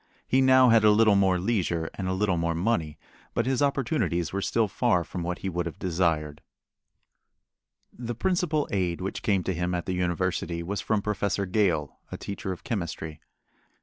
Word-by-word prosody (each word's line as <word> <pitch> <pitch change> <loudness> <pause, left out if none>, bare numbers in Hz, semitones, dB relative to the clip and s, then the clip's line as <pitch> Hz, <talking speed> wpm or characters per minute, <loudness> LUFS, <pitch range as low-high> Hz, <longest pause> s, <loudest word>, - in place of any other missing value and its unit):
He 130 - +3
now 130 -1 +6
had 115 -1 +5
a 105 - +7
little 105 0 +5
more 95 -2 +3
leisure 90 -5 -1
and 95 - -4
a 95 - 0
little 95 -1 +1
more 85 0 -1
money, 85 -5 -1 0.4
but 115 - +1
his 130 +1 0
opportunities 115 - 0
were 100 - -1
still 110 +2 +1
far 100 -3 +1
from 90 +2 -6
what 90 +1 -3
he - - +1
would 85 -2 -2
have 85 - -7
desired. 80 -5 -1 1.5
The 120 -1 -5
principal 175 -1 0
aid 90 -4 0
which 95 +1 -4
came 100 -4 +1
to 95 - -1
him 90 +1 -1
at 85 - -3
the 95 - -2
university 90 -1 -1
was 100 +4 -3
from 105 -2 0
Professor 100 -1 -1
Gale, 90 -7 0
a - - -5
teacher 100 -1 -5
of 90 - -7
chemistry. 80 -7 -4
95 Hz, 180 wpm, -27 LUFS, 85-110 Hz, 1.5 s, a